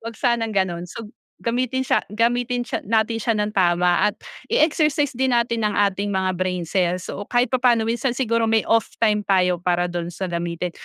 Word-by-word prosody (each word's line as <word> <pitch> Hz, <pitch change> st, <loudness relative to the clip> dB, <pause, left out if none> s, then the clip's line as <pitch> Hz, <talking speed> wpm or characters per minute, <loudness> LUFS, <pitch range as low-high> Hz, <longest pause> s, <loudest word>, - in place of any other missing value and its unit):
Huwag 230 Hz, 0 st, -6 dB
sanang 235 Hz, -3 st, 0 dB
ganon. 180 Hz, -3 st, -1 dB
So 220 Hz, +5 st, -8 dB, 0.4 s
gamitin 255 Hz, +2 st, -1 dB
siya -, -, +2 dB
gamitin 245 Hz, +2 st, +1 dB
siya -, -, -3 dB
natin 225 Hz, +1 st, +1 dB
siya 230 Hz, -, +1 dB
nang 210 Hz, 0 st, -1 dB
tama 175 Hz, -2 st, +3 dB
at -, -, -17 dB, 0.4 s
i-exercise 300 Hz, -2 st, +2 dB
din 265 Hz, +1 st, 0 dB
natin 235 Hz, -1 st, 0 dB
ang 210 Hz, -, -1 dB
ating 200 Hz, 0 st, +1 dB
mga 185 Hz, -1 st, 0 dB
brain 185 Hz, -1 st, -1 dB
cells. 180 Hz, 0 st, 0 dB
So 205 Hz, -, -6 dB
kahit 245 Hz, 0 st, +1 dB
papaano 245 Hz, -3 st, +3 dB
minsan 240 Hz, +2 st, -1 dB
siguro 230 Hz, -3 st, 0 dB
may 220 Hz, -1 st, +2 dB
off 225 Hz, -1 st, +3 dB, 0.2 s
time 210 Hz, -2 st, +3 dB
tayo 180 Hz, -2 st, +2 dB
para 175 Hz, -1 st, +1 dB
do'n 175 Hz, -1 st, -3 dB
sa 185 Hz, +2 st, -4 dB
gamitin. 170 Hz, +1 st, -3 dB
220 Hz, 190 wpm, -22 LUFS, 180-235 Hz, 0.4 s, tama